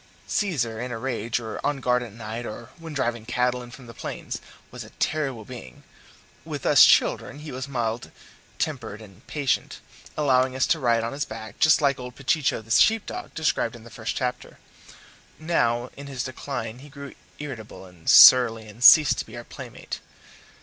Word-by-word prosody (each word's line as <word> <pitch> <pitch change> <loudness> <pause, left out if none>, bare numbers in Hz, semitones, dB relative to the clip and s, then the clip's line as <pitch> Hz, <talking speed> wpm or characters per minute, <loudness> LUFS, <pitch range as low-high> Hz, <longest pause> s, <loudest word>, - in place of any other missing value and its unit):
Caesar 120 - -1
in 125 0 -5
a 120 - -4
rage, 115 -1 -2
or 110 -2 -7
on 145 -1 0
guard 125 -1 +1
at 120 -3 -7
night, 110 +2 -6
or 115 0 -8
when 165 -1 -8
driving 120 -5 -2
cattle 125 +1 0
in 120 - -10
from 125 +1 -13
the 115 - -11
plains, - - -6 0.3
was - - -8
a - - -13
terrible 135 -8 -2
being; 115 - -11 0.6
with - - -6
us - - +7
children 140 - +3
he 150 0 -9
was 130 +1 -5
mild 120 -4 -3 0.5
tempered 105 - -3
and 105 +1 -16
patient, 140 -6 -1 0.4
allowing 130 -3 +2
us 130 - +2
to 165 - +1
ride 120 -3 +2
on 115 - -3
his 145 +1 -2
back, 110 -1 -9
just 155 0 +5
like 140 -2 +2
old 125 0 -8
Pechicho 135 -3 0
the 115 - -12
sheep 220 - +4
dog, - - -7
described 155 -7 0
in 115 - -13
the 120 - -14
first 110 0 -4
chapter. 125 -1 -4 0.8
Now, 125 -7 0
in 140 0 -9
his 130 -3 -4
decline, 125 -3 -5
he 145 +3 -13
grew 140 -1 -10 0.2
irritable 115 -9 -8
and 90 -3 -7
surly, 115 -3 +8
and 110 +3 -9
ceased 150 +3 +8
to - - -3
be - - -10
our - - -7
playmate. - - -8
125 Hz, 185 wpm, -25 LUFS, 115-140 Hz, 0.8 s, surly